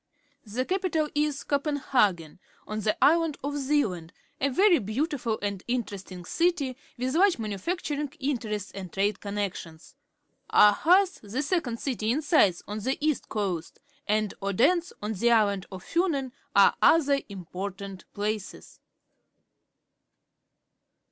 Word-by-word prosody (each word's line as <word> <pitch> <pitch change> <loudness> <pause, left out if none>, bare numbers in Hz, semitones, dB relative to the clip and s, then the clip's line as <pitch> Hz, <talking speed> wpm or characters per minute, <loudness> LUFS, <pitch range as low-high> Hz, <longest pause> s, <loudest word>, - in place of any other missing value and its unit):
— 285 -2 -41
The 255 +1 0
capital 360 -4 0
is 295 -1 0
Copen 285 +1 0
hagen, 185 - +1 0.3
on 215 0 -4
the 215 0 0
island 325 -1 +4
of 285 +1 -2
Zealand, 220 - 0 0.3
a 280 - +1
very 360 +5 +4
beautiful 235 - -2
and 200 -2 -2
interesting 200 -7 -4
city, 325 - 0 0.2
with 255 +2 -2
large 380 +2 +4
manufacturing 285 - -3
interests 225 -8 -2
and 190 -3 -8
trade 200 +1 0
connec 200 -1 -2
tions. 160 0 -11 0.6
Aarhus, 365 - +5
the 225 +7 -3
second 280 -8 -1
city 235 -6 -2
in 295 +6 0
size, 205 - +3
on 210 +1 -4
the 260 +6 -1
east 305 -1 -1
coast, 185 -6 -3 0.3
and 215 -1 +1
Odense, 275 - +2
on 215 +1 -2
the 235 +4 +1
island 205 -4 +2
of 185 -1 -8
Fiinen, 315 -7 0 0.2
are - - +7
other 285 -4 +4
important 195 +1 -7
places. 210 -1 -4
235 Hz, 130 wpm, -27 LUFS, 200-295 Hz, 0.6 s, are